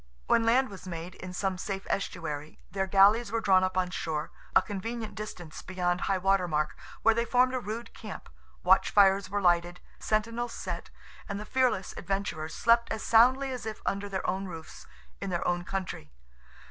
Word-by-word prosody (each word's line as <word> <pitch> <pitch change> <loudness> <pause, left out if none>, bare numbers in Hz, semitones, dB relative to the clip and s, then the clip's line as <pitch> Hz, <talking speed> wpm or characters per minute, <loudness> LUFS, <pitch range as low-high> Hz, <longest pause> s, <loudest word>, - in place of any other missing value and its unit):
When 230 0 +3
land 255 +3 +4
was 195 -2 -10
made, 170 0 -6
in 185 -1 -8
some 185 0 -2
safe 195 0 -4
estuary, 155 -6 -3
their 190 -1 -1
galleys 200 +4 +5
were 230 - +1
drawn 190 -4 +4
up 185 0 -1
on 180 -1 +1
shore, 160 -3 -3 0.2
a - - +8
convenient 220 +2 -5
distance 200 -6 -7
beyond 180 -1 -1
highwater 195 -1 +2
mark, 150 -2 0 0.3
where 225 - +6
they 235 +1 +1
formed 250 +2 +3
a 255 - 0
rude 230 +1 -6
camp, 215 -3 -8 0.4
watch - - +5
fires 195 -1 +4
were 205 +1 -1
lighted, 175 0 +2 0.2
sentinels 230 +2 -1
set, - - -5 0.4
and 200 0 -3
the 210 - -6
fearless 250 -7 +1
adventurers 175 -4 -3
slept 235 0 +3
as 220 - -3
soundly 260 +4 +5
as 250 -3 -5
if 215 -1 -5
under 200 +1 -1
their 190 -1 -3
own 190 +2 -1
roofs, 165 -3 -10 0.3
in 195 - -3
their 175 -2 -1
own 175 0 0
country. 185 - -5
195 Hz, 180 wpm, -29 LUFS, 180-225 Hz, 0.4 s, a